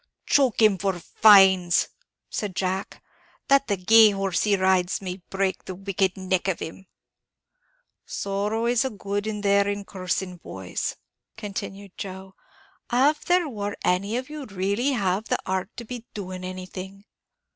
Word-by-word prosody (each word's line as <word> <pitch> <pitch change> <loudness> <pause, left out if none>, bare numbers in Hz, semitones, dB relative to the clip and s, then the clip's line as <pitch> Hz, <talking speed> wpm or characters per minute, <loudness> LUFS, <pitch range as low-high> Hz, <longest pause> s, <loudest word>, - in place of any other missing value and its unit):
"Choke 260 -5 +3
him 205 -3 +5
for 195 0 0
fines!" 190 -2 +5 0.4
said 200 -4 -4
Jack; 190 +1 -3 0.5
"that 275 0 +4
the 200 -3 0
gay 220 +4 +7
horse 195 -3 -1
he 210 -1 +3
rides 185 -1 +2
might 185 -1 -6
break 195 -1 -1
the 185 - -6
wicked 195 0 -1
neck 185 0 -1
of 190 - 0
him!" 185 +4 -8 1.2
"Sorrow 205 +3 -2
a 240 +1 +2
good 205 -1 -4
is 210 -1 -3
there 200 0 +3
in 205 0 -3
cursing, 185 -1 -3
boys," 95 - -5 0.4
continued 200 -2 -7
Joe. 190 0 -7 0.6
"Av 275 +5 +3
there 355 -2 +3
war 205 -6 -4
any 200 +5 +1
of 255 +1 -4
you 300 -2 -7
really'd 200 +7 -1
have 195 -1 0
the - - 0
heart 190 +1 -2
to 235 - -6
be 240 0 -8
doing 185 -3 -6
anything!" 185 +2 -8
195 Hz, 145 wpm, -25 LUFS, 185-215 Hz, 1.2 s, gay